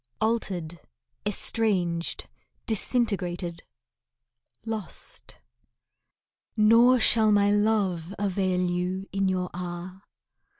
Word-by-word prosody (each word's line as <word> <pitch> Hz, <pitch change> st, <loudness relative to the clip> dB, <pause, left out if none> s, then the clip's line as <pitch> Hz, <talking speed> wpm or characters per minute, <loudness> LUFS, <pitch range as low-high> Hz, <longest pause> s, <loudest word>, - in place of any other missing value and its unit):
Altered, 185 Hz, -7 st, -2 dB, 0.5 s
estranged, 185 Hz, -5 st, 0 dB, 0.4 s
disintegrated, 185 Hz, -7 st, 0 dB, 1.0 s
lost. 220 Hz, -3 st, -6 dB, 1.2 s
Nor 230 Hz, +4 st, +5 dB
shall 220 Hz, -1 st, +6 dB
my 205 Hz, 0 st, +4 dB
love 205 Hz, -4 st, 0 dB
avail 190 Hz, -2 st, 0 dB
you 180 Hz, +2 st, -2 dB
in 195 Hz, 0 st, 0 dB
your 180 Hz, -1 st, -2 dB
hour. 180 Hz, +1 st, -7 dB
195 Hz, 75 wpm, -26 LUFS, 180-215 Hz, 1.2 s, shall